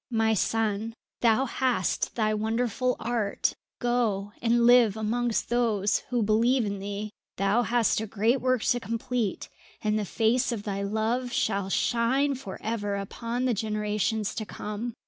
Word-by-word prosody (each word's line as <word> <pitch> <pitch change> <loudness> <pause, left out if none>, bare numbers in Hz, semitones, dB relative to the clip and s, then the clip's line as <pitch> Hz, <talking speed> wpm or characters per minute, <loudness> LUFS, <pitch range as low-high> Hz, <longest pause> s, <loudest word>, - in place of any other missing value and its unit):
"My 225 -2 +2
son, 220 +1 0 0.2
thou 235 +2 +3
hast 245 -7 0
thy 215 -2 +1
wonderful 230 +3 0
art. 230 -4 0 0.2
Go 225 -5 0
and 235 0 +3
live 240 -4 +6
amongst 230 +1 -1
those 220 -4 +2
who 245 -3 +1
believe 230 +4 +3
in 200 -1 -3
thee. 205 +1 -5 0.3
Thou 195 +5 +2
hast 235 -2 +2
a 220 - -4
great 225 +6 +1
work 255 -3 +1
to 245 - +2
complete, 230 -1 -2 0.3
and 215 0 0
the - - -1
face 240 +6 +1
of 220 -4 -3
thy 200 -1 -3
love 220 +5 -1
shall 195 -3 0
shine 255 +7 +2
for 250 -8 -7
ever 205 -2 -2
upon 230 +5 -3
the 250 - +2
generations 210 0 -1
to 220 - -3
come. 215 +2 -5
225 Hz, 150 wpm, -27 LUFS, 210-240 Hz, 0.3 s, live